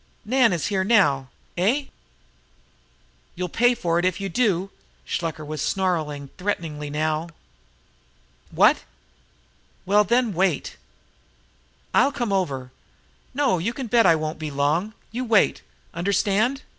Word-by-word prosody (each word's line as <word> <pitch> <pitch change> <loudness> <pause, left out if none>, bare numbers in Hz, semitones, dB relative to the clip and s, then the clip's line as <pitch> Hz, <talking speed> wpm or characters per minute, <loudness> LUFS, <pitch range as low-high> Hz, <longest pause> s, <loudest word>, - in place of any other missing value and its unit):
Nan 245 0 +3
is 170 -4 -1
here 195 -2 0 2.5
now....Eh?....You'll 180 0 -3
pay 245 +6 +3
for 170 -5 0
it - - -1
if 185 +1 0
you 195 0 -3
do!" 195 -3 0 0.3
Shluker 160 -2 -3
was 155 -1 -5
snarling 155 -7 -1
threateningly 160 -6 -3
now. 155 +2 -1 1.2
"What?....Well, - - -1
then, 235 +1 +1
wait! 190 +3 0 1.2
I'll 280 - +4
come 235 -6 -2
over....No, 180 - -3
you 215 +8 -2
can 265 - -5
bet 235 0 +4
I 165 - +6
won't 155 0 -4
be 155 -1 -4
long! 150 +9 0 0.2
You 245 +3 -3
wait! 225 -4 +3 0.3
Understand?" 200 - 0
185 Hz, 110 wpm, -23 LUFS, 155-215 Hz, 2.5 s, I